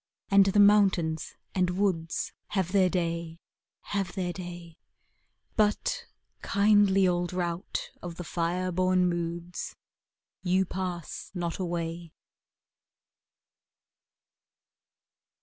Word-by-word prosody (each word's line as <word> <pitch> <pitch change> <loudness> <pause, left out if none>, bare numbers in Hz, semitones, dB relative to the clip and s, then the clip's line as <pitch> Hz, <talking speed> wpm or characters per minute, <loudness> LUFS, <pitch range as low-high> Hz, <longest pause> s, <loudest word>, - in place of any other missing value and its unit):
id 195 0 +7
the 195 +1 +3
mountains 195 -6 +4 0.2
and 180 -1 +2
woods 175 -5 0
Have 190 -3 -1
their 190 -2 +4
day, 170 -2 -2 0.6
have 195 -3 -1
their 180 -2 -2
day 175 -2 -8 0.8
But, 210 -1 +1 0.3
kindly 200 -2 +4
old 175 0 0
rout 175 +1 -3
Of 175 -1 -6
the 180 - -6
fire 175 +2 -1
born 185 0 +3
moods, 170 0 -3 0.7
You 185 +1 +2
pass 180 -3 -5
?iot 170 -2 -2
aiuay. 170 -2 -3
180 Hz, 95 wpm, -28 LUFS, 170-190 Hz, 0.8 s, id